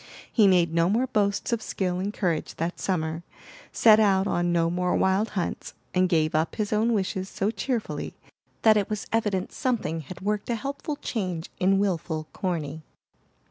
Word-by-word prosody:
He 215 Hz, -4 st, +6 dB
made 175 Hz, -3 st, +3 dB
no 165 Hz, +1 st, +3 dB
more 230 Hz, +6 st, +2 dB
boasts 210 Hz, -2 st, 0 dB
of 230 Hz, -, 0 dB
skill 180 Hz, -4 st, -2 dB
and 200 Hz, +2 st, -2 dB
courage 175 Hz, -7 st, -2 dB
that 170 Hz, +2 st, -3 dB
summer, 160 Hz, -3 st, -1 dB, 0.5 s
set 220 Hz, -2 st, +6 dB
out 195 Hz, -3 st, +4 dB
on 175 Hz, -2 st, 0 dB
no 170 Hz, -1 st, +2 dB
more 180 Hz, 0 st, 0 dB
wild 190 Hz, +3 st, +2 dB
hunts, 180 Hz, -, -3 dB, 0.2 s
and 185 Hz, 0 st, +3 dB
gave 155 Hz, -3 st, +2 dB
up 155 Hz, +1 st, 0 dB
his 215 Hz, 0 st, -1 dB
own 225 Hz, +3 st, +2 dB
wishes 190 Hz, -2 st, -1 dB
so 200 Hz, +2 st, -1 dB
cheerfully 230 Hz, +2 st, -3 dB, 0.5 s
that 220 Hz, -1 st, +6 dB
it 205 Hz, -, 0 dB
was 210 Hz, -2 st, -3 dB
evident 205 Hz, -5 st, 0 dB
something 230 Hz, -10 st, -1 dB
had 175 Hz, +5 st, -10 dB
worked 210 Hz, +2 st, -2 dB
a 235 Hz, -, +1 dB
helpful 280 Hz, +5 st, -4 dB
change 185 Hz, -, -4 dB
in 195 Hz, +1 st, +3 dB
wilful 170 Hz, -5 st, -1 dB
Corny. 160 Hz, -5 st, -3 dB
190 Hz, 175 wpm, -26 LUFS, 170-215 Hz, 0.5 s, He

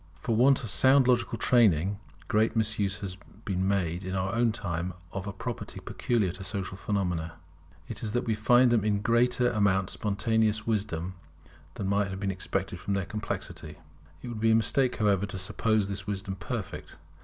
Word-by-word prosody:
For 110 Hz, +8 st, -2 dB
want 130 Hz, +3 st, +4 dB
of 110 Hz, -, -4 dB
sound 130 Hz, +2 st, +5 dB
logical 120 Hz, -1 st, +2 dB
training, 100 Hz, -6 st, +3 dB, 0.3 s
great 110 Hz, +2 st, +2 dB
misuse 105 Hz, -2 st, 0 dB
has 95 Hz, -2 st, -5 dB, 0.3 s
been 95 Hz, -1 st, 0 dB
made 90 Hz, -2 st, 0 dB
in 95 Hz, +1 st, -3 dB
our 95 Hz, +1 st, -1 dB
own 115 Hz, -1 st, +3 dB
time 90 Hz, -5 st, -3 dB, 0.2 s
of 95 Hz, 0 st, -5 dB
a -, -, -2 dB
property 115 Hz, +4 st, -6 dB
peculiar 110 Hz, -7 st, 0 dB
to 95 Hz, +2 st, -8 dB
social 95 Hz, 0 st, -3 dB
phenomena. 90 Hz, -5 st, -2 dB, 0.5 s
It 115 Hz, -, -7 dB
is 110 Hz, -2 st, -3 dB
that 120 Hz, 0 st, 0 dB
we 115 Hz, -, +1 dB
find 120 Hz, +3 st, +4 dB
in 115 Hz, -, +3 dB
them 105 Hz, 0 st, +1 dB
a -, -, +1 dB
greater 120 Hz, +3 st, +2 dB
amount 100 Hz, -4 st, +2 dB
of -, -, -3 dB
spontaneous 110 Hz, +1 st, 0 dB
wisdom 95 Hz, -5 st, -1 dB, 0.6 s
than 100 Hz, -, -4 dB
might 100 Hz, +1 st, +1 dB
have 95 Hz, 0 st, -5 dB
been 100 Hz, 0 st, -1 dB
expected 95 Hz, -1 st, -3 dB
from 100 Hz, -, -2 dB
their 95 Hz, -2 st, -1 dB
complexity. 95 Hz, -6 st, -5 dB, 0.5 s
It -, -, -5 dB
would 115 Hz, -2 st, -5 dB
be 115 Hz, -, +4 dB
a 110 Hz, -, +5 dB
mistake, 125 Hz, +3 st, +2 dB
however, 105 Hz, -2 st, +2 dB
to 95 Hz, -, -6 dB
suppose 105 Hz, +3 st, +1 dB
this 95 Hz, -1 st, -5 dB
wisdom 100 Hz, -1 st, -3 dB
perfect. 90 Hz, -3 st, -6 dB
105 Hz, 190 wpm, -28 LUFS, 95-115 Hz, 0.6 s, sound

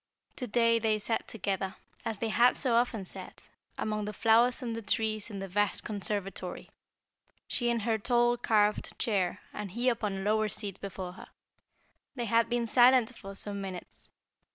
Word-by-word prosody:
To 250 Hz, -, -2 dB
day 230 Hz, +1 st, +3 dB
they 220 Hz, -1 st, +2 dB
sat 225 Hz, +2 st, -2 dB
together, 195 Hz, -2 st, -3 dB, 0.3 s
as 220 Hz, -, -2 dB
they 225 Hz, +2 st, -2 dB
had 240 Hz, +3 st, +4 dB
so 255 Hz, -4 st, 0 dB
often 230 Hz, -4 st, +1 dB
sat, -, -, -10 dB, 0.3 s
among 215 Hz, -1 st, -2 dB
the 210 Hz, -, -4 dB
flowers 230 Hz, +4 st, +3 dB
and 230 Hz, -2 st, -3 dB
the 230 Hz, -, -4 dB
trees 215 Hz, 0 st, -1 dB
in 205 Hz, -, -6 dB
the 195 Hz, 0 st, -5 dB
vast 205 Hz, +2 st, +1 dB
conservatory, 200 Hz, -1 st, -3 dB, 0.8 s
she 240 Hz, -1 st, 0 dB
in 235 Hz, -1 st, +1 dB
her 220 Hz, 0 st, 0 dB
tall, 240 Hz, +1 st, +3 dB
carved 210 Hz, -3 st, +1 dB
chair 195 Hz, -6 st, 0 dB
and 210 Hz, -2 st, -5 dB
he 240 Hz, +7 st, +1 dB
upon 220 Hz, -4 st, -1 dB
a -, -, -4 dB
lower 215 Hz, +2 st, +1 dB
seat 200 Hz, -1 st, -3 dB
before 190 Hz, -2 st, -5 dB
her. -, -, -12 dB, 0.9 s
They 240 Hz, -3 st, -2 dB
had 230 Hz, +1 st, +2 dB
been 240 Hz, -1 st, 0 dB
silent 250 Hz, +1 st, +5 dB
for 195 Hz, -2 st, -9 dB
some 200 Hz, 0 st, -1 dB
minutes. 185 Hz, -2 st, -7 dB
220 Hz, 175 wpm, -30 LUFS, 200-235 Hz, 0.9 s, silent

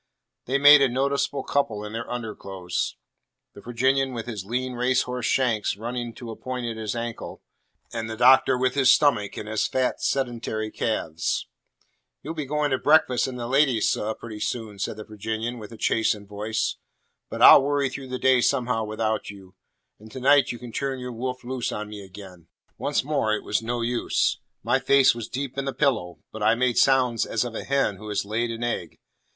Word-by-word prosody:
They 135 Hz, +3 st, +1 dB
made 145 Hz, +1 st, +8 dB
a 135 Hz, -, +4 dB
noticeable 140 Hz, +1 st, -1 dB
couple 110 Hz, -7 st, -1 dB
in 105 Hz, -, -8 dB
their 115 Hz, +1 st, -5 dB
underclothes; 100 Hz, -6 st, -4 dB, 0.6 s
the 100 Hz, -, -12 dB
Virginian 130 Hz, +3 st, +1 dB
with 115 Hz, -2 st, -5 dB
his 110 Hz, -6 st, -5 dB
lean 125 Hz, +5 st, -3 dB
racehorse 125 Hz, 0 st, 0 dB
shanks 115 Hz, -6 st, +1 dB
running 120 Hz, +2 st, -4 dB
to 120 Hz, -2 st, -8 dB
a -, -, -7 dB
point 125 Hz, 0 st, -5 dB
at 115 Hz, -1 st, -3 dB
his 110 Hz, 0 st, -4 dB
ankle, 115 Hz, -1 st, -6 dB, 0.5 s
and 115 Hz, -1 st, -4 dB
the 110 Hz, -, -5 dB
Doctor 130 Hz, +1 st, +5 dB
with 130 Hz, 0 st, +1 dB
his 135 Hz, -2 st, +5 dB
stomach 120 Hz, -9 st, +2 dB
and 105 Hz, -, -6 dB
his 110 Hz, -1 st, 0 dB
fat 130 Hz, -1 st, -1 dB
sedentary 120 Hz, -4 st, -2 dB
calves. 80 Hz, -8 st, -2 dB, 0.8 s
"You'll 160 Hz, -, -5 dB
be 155 Hz, -4 st, -5 dB
going 150 Hz, 0 st, 0 dB
to 130 Hz, -, +1 dB
breakfast 145 Hz, -5 st, +3 dB
and 130 Hz, -1 st, -6 dB
the 120 Hz, -, -4 dB
ladies, 130 Hz, -3 st, +2 dB
seh, 110 Hz, +1 st, -1 dB
pretty 110 Hz, -2 st, -8 dB
soon," 110 Hz, -3 st, -4 dB
said 105 Hz, -, -3 dB
the 110 Hz, -, -7 dB
Virginian, 110 Hz, +3 st, -4 dB
with 105 Hz, 0 st, -10 dB
a 115 Hz, -, -10 dB
chastened 105 Hz, -3 st, 0 dB
voice. 105 Hz, +2 st, -2 dB, 0.5 s
"But -, -, -1 dB
I'll -, -, +10 dB
worry 140 Hz, 0 st, +1 dB
through 130 Hz, +1 st, -7 dB
the 130 Hz, 0 st, -4 dB
day 130 Hz, -1 st, +4 dB
somehow 125 Hz, -4 st, +1 dB
without 110 Hz, 0 st, -2 dB
y'u. 95 Hz, -2 st, -12 dB, 0.5 s
And 110 Hz, +1 st, -14 dB
to 130 Hz, -, -6 dB
night 140 Hz, +2 st, +4 dB
you 120 Hz, -, -6 dB
can 120 Hz, 0 st, -10 dB
turn 135 Hz, +3 st, -2 dB
your 125 Hz, -1 st, -6 dB
wolf 125 Hz, +2 st, -4 dB
loose 125 Hz, 0 st, -3 dB
on 105 Hz, 0 st, -5 dB
me 105 Hz, -1 st, -8 dB
again." 95 Hz, -3 st, -13 dB, 0.3 s
Once 145 Hz, -, 0 dB
more 135 Hz, -7 st, 0 dB
it -, -, -6 dB
was 105 Hz, -, 0 dB
no 120 Hz, +1 st, -3 dB
use. 120 Hz, +1 st, 0 dB, 0.2 s
My 130 Hz, -, +2 dB
face 135 Hz, 0 st, +5 dB
was 115 Hz, -2 st, -7 dB
deep 135 Hz, 0 st, -4 dB
in 135 Hz, -, -3 dB
the 135 Hz, -, -2 dB
pillow, 100 Hz, -, -1 dB
but 110 Hz, -, -8 dB
I 110 Hz, +2 st, +4 dB
made 125 Hz, 0 st, +1 dB
sounds 130 Hz, -4 st, +3 dB
as 115 Hz, +2 st, 0 dB
of 120 Hz, -, -5 dB
a -, -, -5 dB
hen 135 Hz, -8 st, 0 dB
who 105 Hz, +2 st, -9 dB
has 105 Hz, -1 st, -1 dB
laid 115 Hz, +3 st, -1 dB
an 115 Hz, +1 st, -5 dB
egg. 105 Hz, -9 st, -3 dB
120 Hz, 200 wpm, -25 LUFS, 110-130 Hz, 0.8 s, I'll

